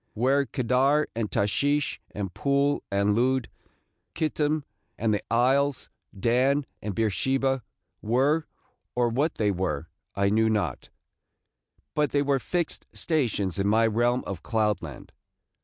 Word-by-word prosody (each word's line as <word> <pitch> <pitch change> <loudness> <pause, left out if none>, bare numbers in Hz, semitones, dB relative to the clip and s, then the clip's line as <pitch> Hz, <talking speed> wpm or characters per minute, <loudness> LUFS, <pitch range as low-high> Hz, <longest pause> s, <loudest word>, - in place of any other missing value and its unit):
Where 135 +4 +2
Kedar 135 +4 +2
and 110 -2 -1
Tashish 145 +10 0
and 95 -3 -5
Pul 140 +1 +1
and 100 +1 +2
Lud, 130 +1 +1 0.7
Chittim 155 -1 0 0.3
and 110 -1 +1
the 105 - 0
Isles, 135 +4 +2 0.3
Dan 130 +6 +2 0.2
and 105 -2 -4
Beersheba, 130 +5 +1 0.4
were, 140 +8 +2 0.5
or 120 -1 +2
what 145 +7 0
they 105 -2 +1
were, 85 -5 -2 0.3
I 100 0 +2
knew 110 +1 +3
not, 110 -2 -1 1.0
but 150 -1 +1
they 145 0 +3
were 140 -1 +2
fixed 175 +4 -2
stations 115 - -1
in 100 - +1
my 110 +2 +4
realm 120 +3 +1
of 95 -4 -5
cloud 110 -2 0
land. 75 -6 -9
120 Hz, 130 wpm, -26 LUFS, 105-140 Hz, 1.0 s, my